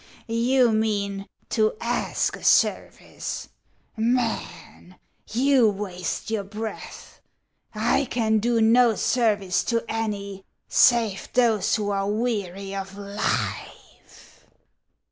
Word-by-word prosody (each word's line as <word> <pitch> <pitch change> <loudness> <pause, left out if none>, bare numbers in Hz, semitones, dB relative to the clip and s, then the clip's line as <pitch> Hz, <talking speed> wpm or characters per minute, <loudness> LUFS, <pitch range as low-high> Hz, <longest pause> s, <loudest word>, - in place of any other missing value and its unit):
" - - -25 0.2
You 255 -3 +5
mean, 200 -2 -1 0.2
to 215 -1 +1
ask 240 +1 -1
a - - -13
service. - - 0 0.5
Man, 230 -5 -2 0.4
you 255 0 +4
waste 195 0 -4
your 215 -3 -1
breath. 215 +2 -8 0.5
I 235 +6 +1
can 220 -3 +1
do 235 +2 +1
no 230 +1 +5
service 205 -8 +1
to 230 -1 0
any 200 -4 -4 0.2
save 225 -5 +3
those 230 -5 +2
who 205 -2 -2
are 195 0 -1
weary 200 -4 -2
of 195 0 -6
life." 200 +1 -5
215 Hz, 105 wpm, -24 LUFS, 200-235 Hz, 0.5 s, You